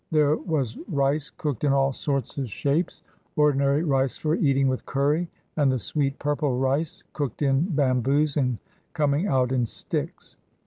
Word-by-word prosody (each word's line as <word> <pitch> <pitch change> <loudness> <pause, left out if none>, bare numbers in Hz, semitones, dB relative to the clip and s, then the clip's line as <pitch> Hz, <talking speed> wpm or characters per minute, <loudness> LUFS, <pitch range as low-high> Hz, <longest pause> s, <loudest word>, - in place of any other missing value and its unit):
There 150 -1 +3
was 140 -10 -2
rice 145 -2 0
cooked 145 -5 -4
in 140 -2 +3
all 135 0 +2
sorts 140 -1 -2
of 130 -4 -3
shapes, 145 - -1 0.3
ordinary 145 0 +3
rice 135 -4 +1
for 155 0 0
eating 140 -5 +2
with 130 -1 -1
curry, 150 +5 0 0.3
and 145 -4 +3
the 130 - +1
sweet 140 +3 -1
purple 145 -3 0
rice, 135 +5 -1
cooked 145 -2 -3
in 135 +3 +3
bamboos 140 +2 +2
and 125 -5 +1 0.4
coming 150 +3 +1
out 130 -6 +2
in 125 -3 +1
sticks. - - -4
140 Hz, 160 wpm, -25 LUFS, 135-150 Hz, 0.4 s, There